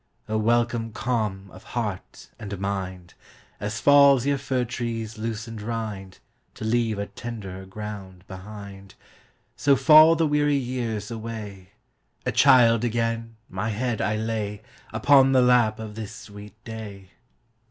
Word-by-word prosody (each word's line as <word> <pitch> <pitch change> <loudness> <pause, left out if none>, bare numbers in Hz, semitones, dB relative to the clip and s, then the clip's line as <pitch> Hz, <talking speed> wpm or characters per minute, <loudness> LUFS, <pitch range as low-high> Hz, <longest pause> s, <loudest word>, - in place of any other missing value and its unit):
O 110 - -2
welcome 115 +1 +1
calm 110 -6 -2
of 95 - -13 0.2
heart 105 -5 -5
and 100 -1 -6
mind! 95 -2 -4 0.5
As 105 +2 -4
falls 140 -3 +6
yon 140 -1 +1
fir 130 -2 -1
tree's 115 -2 -4
loosened 115 0 -5
rindTo 105 -4 -5 0.4
leave 110 -1 0
a 100 - -2
tenderer 100 -4 -8
growth 95 -2 -8
behind, 100 0 -10 0.6
So 140 -1 +3
fall 155 +4 +7
the 165 0 +2
weary 145 -1 +2
years 120 -5 -3
away;A 105 -4 -8
child 120 -4 +5
again, 115 -1 -2
my 110 - -3
head 115 +1 -2
I 105 +2 0
layUpon 110 +5 +1
the 130 - +5
lap 120 -3 +4
of 110 -1 -7
this 110 -1 -7
sweet 105 0 -12
day. 105 -4 -9
110 Hz, 125 wpm, -25 LUFS, 105-120 Hz, 0.6 s, fall